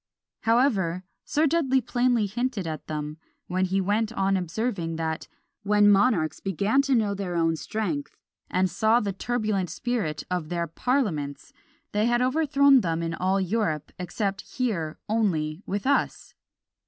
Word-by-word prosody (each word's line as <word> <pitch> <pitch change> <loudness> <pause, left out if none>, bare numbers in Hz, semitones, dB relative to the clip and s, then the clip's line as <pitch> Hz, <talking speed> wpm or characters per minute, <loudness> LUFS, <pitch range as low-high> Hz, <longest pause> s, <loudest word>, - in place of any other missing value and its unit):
However, 215 -7 +2 0.2
Sir 305 +2 +2
Dudley 275 -4 +2
plainly 245 -2 +1
hinted 225 -1 -2
at 155 -1 -5
them, 150 0 -4 0.3
when 185 +1 0
he 190 +1 0
went 210 +3 0
on 195 -3 +1
observing, 180 -1 -2
that 160 0 -3 0.3
"when 205 0 +4
monarchs 195 -6 +2
began 200 - +1
to 275 -1 +1
know 215 -3 +2
their 190 -3 -4
own 165 -1 +2
strength, 160 -5 -3 0.3
and 185 +1 +2
saw 220 +5 +3
the 200 -4 -2
turbulent 210 -3 -1
spirit 220 -11 -2
of 175 -4 -2
their 170 -1 -1
parliaments, 165 - -2 0.4
they 210 +2 +1
had 240 0 +2
overthrown 280 -1 +4
them 165 -3 -1
in 165 0 -2
all 190 +3 +1
Europe, 185 -6 -1
except 195 +2 -2 0.2
here 185 - -1
only 180 -7 0
with 200 +3 -3
us." 280 +1 0
200 Hz, 145 wpm, -26 LUFS, 170-240 Hz, 0.4 s, when